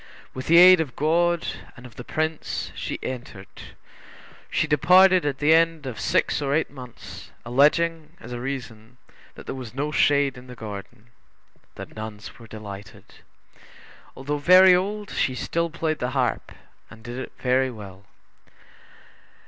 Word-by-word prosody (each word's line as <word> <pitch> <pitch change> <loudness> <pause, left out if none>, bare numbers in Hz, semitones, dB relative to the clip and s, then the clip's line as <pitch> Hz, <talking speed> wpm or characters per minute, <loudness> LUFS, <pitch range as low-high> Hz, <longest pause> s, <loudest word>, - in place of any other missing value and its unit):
With 130 +1 -7
the 170 - +5
aid 180 0 +9
of 135 -7 -5
God, 170 +3 +1 0.3
and 120 - -13
of 125 - -14
the 125 - -8
Prince, 155 +3 -3
she - - -5
entered. 115 -6 -9 0.7
She - - 0
departed 180 +3 +5
at 140 -2 -2
the 150 +3 +3
end 165 -2 +2
of 125 -4 -6
six - - 0
or 140 0 0
eight 160 - -1
months, 125 -4 -11 0.2
alleging 155 +5 +1
as 120 - -11
a 120 - -5
reason, 125 -3 -7 0.4
that - - -12
there - - -5
was 125 -3 -9
no 145 +2 -2
shade 140 -4 +2
in 125 - -15
the 125 - -10
garden. 110 +1 -10 0.6
The - - -7
nuns 110 0 -9
were 115 - -13
delighted. 105 -2 -11 1.0
Although 145 +2 -3
very 185 +4 +7
old, 205 +3 -1
she 130 - -1
still 170 +6 -2
played 160 -1 -3
the 125 - -2
harp, 125 -2 -1 0.4
and 115 -1 -15
did 120 +2 -7
it - - -7
very 130 +1 +1
well. 100 -4 -11
135 Hz, 155 wpm, -24 LUFS, 120-160 Hz, 1.0 s, aid